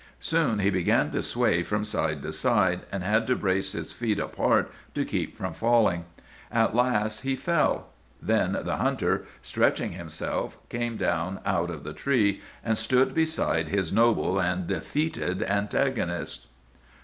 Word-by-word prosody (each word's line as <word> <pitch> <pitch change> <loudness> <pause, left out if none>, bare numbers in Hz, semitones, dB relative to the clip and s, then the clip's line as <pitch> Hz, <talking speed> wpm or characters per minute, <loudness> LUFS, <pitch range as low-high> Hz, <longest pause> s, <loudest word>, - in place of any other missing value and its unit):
"Soon 160 -9 +1
he 100 0 +2
began 90 -2 +2
to - - -1
sway 85 - +2
from 105 +5 -1
side - - -1
to 80 - -4
side, 95 -3 +2
and 95 -2 -3
had 110 +4 +2
to 125 - +3
brace 95 -2 0
his 85 -1 -5
feet 110 -4 -1
apart - - +1 0.2
to - - 0
keep - - -3
from - - -4
falling. 115 -8 +2 0.5
At 115 -1 +2
last 110 -4 +2
he 135 0 0
fell. 170 +4 +1 0.3
Then - - +1
the - - -2
hunter, - - 0 0.2
stretching - - +1
himself, 85 -3 -4
came 120 -1 -2
down 90 +3 -1
out 85 -2 +1
of 80 -4 -6
the 75 - -6
tree 110 - +1 0.2
and 110 -1 +1
stood 125 +4 +2
beside 160 - +1
his 95 -3 0
noble 115 -3 +3
and 90 0 0
defeated 90 - -1
antagonist. 100 - -1
100 Hz, 150 wpm, -27 LUFS, 90-120 Hz, 0.5 s, to